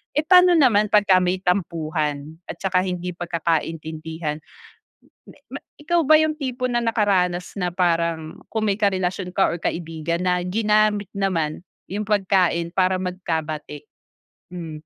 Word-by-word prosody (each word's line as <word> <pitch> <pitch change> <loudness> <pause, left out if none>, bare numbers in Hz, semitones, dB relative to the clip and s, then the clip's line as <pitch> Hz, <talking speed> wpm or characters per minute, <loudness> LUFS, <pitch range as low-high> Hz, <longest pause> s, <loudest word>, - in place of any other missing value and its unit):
Eh 300 - +3
paano 360 +1 +6
naman 220 -8 +4
pagka 205 -3 +5
may 180 +1 +1
tampuhan 160 -5 -2
at - - -4
tsaka 185 -1 +1
hindi 180 -1 -3
pagkakaintindihan, 160 -2 -3 1.4
ikaw 335 +2 +1
ba 310 - +7
yung 310 -1 0
tipo 255 -3 -2
na 240 -1 0
nakaranas 185 -6 0
na 180 -1 -1
parang 170 -3 0
kung 215 -1 0
may 195 - +1
karelasyon 185 -2 -1
ka 195 - +3
or 170 - -2
kaibigan 165 0 -3
na 180 -1 +1
ginamit 210 +1 +1
naman 170 -6 -1 0.3
yung 205 +2 -3
pagkain 185 -4 +1
para 185 0 +3
magkabati? 160 -5 -4 0.7
Hmm. 170 -3 -6
180 Hz, 130 wpm, -22 LUFS, 165-210 Hz, 1.4 s, ba